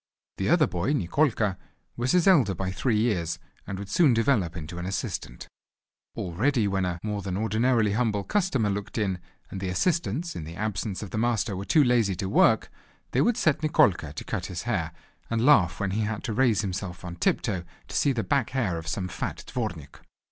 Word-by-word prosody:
The -, -, -1 dB
other -, -, +5 dB
boy 90 Hz, +11 st, -1 dB
Nikolka 110 Hz, -, +1 dB, 0.4 s
was 120 Hz, +2 st, 0 dB
his 180 Hz, -2 st, +4 dB
elder 135 Hz, -, +5 dB
by 95 Hz, +2 st, -3 dB
three 110 Hz, +3 st, 0 dB
years, 100 Hz, -8 st, 0 dB, 0.3 s
and 100 Hz, -, -4 dB
would 100 Hz, +1 st, -6 dB
soon 140 Hz, -, +4 dB
develop 110 Hz, -8 st, +1 dB
into 85 Hz, +2 st, -7 dB
an 90 Hz, -, -4 dB
assistant. 90 Hz, -9 st, -4 dB, 0.7 s
Already 110 Hz, +6 st, +1 dB
when 95 Hz, -1 st, 0 dB
a 90 Hz, -1 st, -3 dB
more 105 Hz, -1 st, -2 dB
than 95 Hz, -1 st, -3 dB
ordinarily 110 Hz, 0 st, +2 dB
humble 105 Hz, -2 st, 0 dB
customer 140 Hz, -, +1 dB
looked 100 Hz, +2 st, -4 dB
in, 95 Hz, -4 st, 0 dB, 0.3 s
and 95 Hz, -, -5 dB
the 95 Hz, -, -2 dB
assistants 165 Hz, -, 0 dB
in 80 Hz, -, -5 dB
the 80 Hz, +2 st, -8 dB
absence 105 Hz, 0 st, -3 dB
of 100 Hz, -, -8 dB
the 110 Hz, -, -2 dB
master 115 Hz, -3 st, 0 dB
were 95 Hz, +1 st, -5 dB
too 155 Hz, +6 st, +4 dB
lazy 120 Hz, -6 st, +2 dB
to 95 Hz, +2 st, -3 dB
work, -, -, +3 dB, 0.4 s
they -, -, +2 dB
would 235 Hz, -1 st, +2 dB
set 155 Hz, -2 st, +2 dB
Nikolka 150 Hz, -, +3 dB
to -, -, -6 dB
cut -, -, -3 dB
his -, -, -5 dB
hair, -, -, -1 dB, 0.4 s
and 115 Hz, +1 st, 0 dB
laugh 90 Hz, -, +5 dB
when 100 Hz, -1 st, -1 dB
he 105 Hz, +3 st, 0 dB
had 110 Hz, 0 st, -2 dB
to 115 Hz, -, -2 dB
raise 115 Hz, -3 st, +3 dB
himself 95 Hz, -2 st, -5 dB
on 85 Hz, -1 st, -6 dB
tiptoe 95 Hz, +1 st, 0 dB, 0.2 s
to -, -, -8 dB
see 140 Hz, -, +3 dB
the 120 Hz, -4 st, -1 dB
back 130 Hz, +5 st, +1 dB
hair 110 Hz, -11 st, -1 dB
of 80 Hz, -, -10 dB
some 90 Hz, +3 st, -2 dB
fat -, -, -5 dB
_dvornik. 90 Hz, -, -4 dB
105 Hz, 200 wpm, -26 LUFS, 95-125 Hz, 0.7 s, other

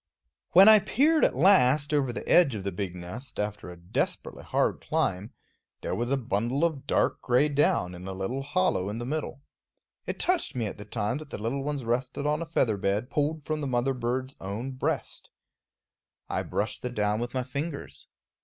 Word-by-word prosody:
When 190 Hz, +4 st, +9 dB
I 215 Hz, -1 st, +9 dB
peered 290 Hz, -, +2 dB
at -, -, +3 dB
last 145 Hz, -3 st, +4 dB
over 140 Hz, -4 st, +2 dB
the 120 Hz, -, -6 dB
edge 140 Hz, -9 st, +5 dB
of 100 Hz, -, -5 dB
the 100 Hz, -, -2 dB
big 90 Hz, -1 st, -4 dB
nest, 100 Hz, +9 st, -8 dB
after 105 Hz, -3 st, -3 dB
a 90 Hz, -, -10 dB
desperately 85 Hz, +1 st, -3 dB
hard -, -, 0 dB
climb, 95 Hz, +5 st, -1 dB, 0.5 s
there -, -, -3 dB
was 120 Hz, +1 st, -1 dB
a 140 Hz, -, +2 dB
bundle 120 Hz, +5 st, 0 dB
of 155 Hz, -5 st, -3 dB
dark -, -, +1 dB
gray 125 Hz, +4 st, +3 dB
down 140 Hz, -11 st, +1 dB
in 90 Hz, +1 st, -9 dB
a 95 Hz, -, -4 dB
little 95 Hz, +8 st, -3 dB
hollow 145 Hz, -, 0 dB
in 105 Hz, -, -4 dB
the 120 Hz, -, -4 dB
middle. 140 Hz, 0 st, -4 dB, 0.6 s
It -, -, -3 dB
touched 360 Hz, -, +1 dB
me 120 Hz, -3 st, -1 dB
at 105 Hz, -, -6 dB
the 105 Hz, -, -8 dB
time 105 Hz, +4 st, -2 dB
that 155 Hz, -2 st, -10 dB
the -, -, -5 dB
little 115 Hz, +6 st, -2 dB
ones 145 Hz, -3 st, -3 dB
rested 125 Hz, +4 st, -2 dB
on 150 Hz, +2 st, +1 dB
a 170 Hz, -, -4 dB
feather 115 Hz, -10 st, +1 dB
bed 100 Hz, +6 st, -1 dB
pulled 150 Hz, 0 st, -1 dB
from 155 Hz, -1 st, -2 dB
the 140 Hz, -, -2 dB
mother 130 Hz, +1 st, +1 dB
bird's 130 Hz, +2 st, -3 dB
own 105 Hz, +7 st, -4 dB
breast. 130 Hz, -, -3 dB, 1.0 s
I -, -, -1 dB
brushed -, -, -3 dB
the 125 Hz, -, -3 dB
down 105 Hz, -2 st, 0 dB
with 120 Hz, +2 st, -4 dB
my 130 Hz, -, 0 dB
fingers. 140 Hz, -, -6 dB
125 Hz, 200 wpm, -27 LUFS, 105-145 Hz, 1.0 s, When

